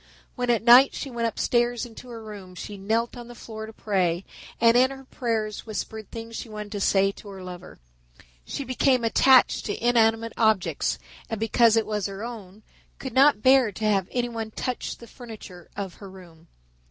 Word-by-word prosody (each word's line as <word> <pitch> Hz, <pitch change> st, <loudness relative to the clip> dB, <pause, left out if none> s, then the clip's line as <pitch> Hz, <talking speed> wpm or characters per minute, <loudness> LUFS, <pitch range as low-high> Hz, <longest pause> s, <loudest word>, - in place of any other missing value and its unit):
When 245 Hz, -1 st, -2 dB
at 235 Hz, -2 st, +2 dB
night 250 Hz, +3 st, +7 dB
she 275 Hz, -, -5 dB
went 235 Hz, -1 st, -1 dB
upstairs 240 Hz, +1 st, 0 dB
into 240 Hz, +1 st, -12 dB
her 230 Hz, -1 st, -8 dB
own -, -, -12 dB
room 195 Hz, -4 st, -10 dB
she 205 Hz, +4 st, -7 dB
knelt 225 Hz, +5 st, -1 dB
on 240 Hz, -1 st, -9 dB
the 240 Hz, -, -11 dB
floor 220 Hz, -2 st, -8 dB
to -, -, -9 dB
pray 185 Hz, -5 st, -1 dB, 0.3 s
and 230 Hz, 0 st, +5 dB
in 255 Hz, +1 st, +5 dB
her 270 Hz, 0 st, -9 dB
prayers 225 Hz, -5 st, -3 dB
whispered 220 Hz, 0 st, -5 dB
things 230 Hz, 0 st, -8 dB
she 230 Hz, -, -6 dB
wanted 210 Hz, -1 st, -7 dB
to 205 Hz, -, -4 dB
say 195 Hz, 0 st, +3 dB
to 205 Hz, -, -14 dB
her 190 Hz, -1 st, -9 dB
lover. 180 Hz, -1 st, -9 dB, 0.7 s
She 280 Hz, -, -5 dB
became 255 Hz, -1 st, +2 dB
attached 255 Hz, +3 st, +5 dB
to 205 Hz, -, -3 dB
inanimate 225 Hz, -1 st, +3 dB
objects, 220 Hz, -4 st, +1 dB, 0.3 s
and 225 Hz, -3 st, -3 dB
because 225 Hz, 0 st, +4 dB
it 225 Hz, -, +2 dB
was 210 Hz, -2 st, -2 dB
her 195 Hz, +1 st, -7 dB
own, 215 Hz, -4 st, -9 dB, 0.3 s
could 265 Hz, -, -7 dB
not 270 Hz, -4 st, +5 dB
bare 260 Hz, -4 st, +5 dB
to 215 Hz, -, -4 dB
have 195 Hz, -3 st, +2 dB
anyone 235 Hz, -3 st, -2 dB
touch 250 Hz, +3 st, -4 dB
the 235 Hz, -, -12 dB
furniture 220 Hz, -7 st, -11 dB
of 195 Hz, -3 st, -4 dB
her 200 Hz, -, -11 dB
room. 175 Hz, -3 st, -15 dB
225 Hz, 190 wpm, -25 LUFS, 205-240 Hz, 0.7 s, night